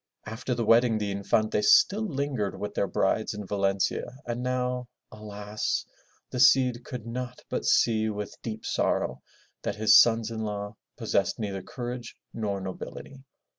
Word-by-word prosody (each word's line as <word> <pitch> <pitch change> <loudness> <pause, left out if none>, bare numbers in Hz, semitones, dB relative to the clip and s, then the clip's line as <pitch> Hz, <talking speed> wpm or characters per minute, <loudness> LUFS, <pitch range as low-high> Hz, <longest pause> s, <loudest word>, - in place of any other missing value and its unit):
After 115 +3 -3
the 120 -1 -1
wedding 115 0 +5
the 105 -1 -2
Infantes 105 +1 +2
still 205 +2 +5
lingered 140 - -2
with 105 0 -4
their 100 - 0
brides 105 +3 0
in 105 -1 -6
Valencia, 100 +5 -1
and 120 0 -3
now, 125 0 -1 0.2
alas! 105 - -3 0.5
the 125 - -3
Cid 125 -1 +5
could 125 -4 -7
not 125 +1 -5
but - - -2
see 110 -1 +3
with 105 -1 -5
deep 110 -1 -6
sorrow - - 0 0.4
that - - -2
his 110 0 +8
sons 115 -1 +2
in 110 - -4
law 105 0 -4 0.2
possessed 95 -3 0
neither 100 -3 -3
courage 120 +2 -6 0.2
nor 105 -3 -2
nobility. 95 +8 -8
110 Hz, 150 wpm, -27 LUFS, 105-125 Hz, 0.5 s, his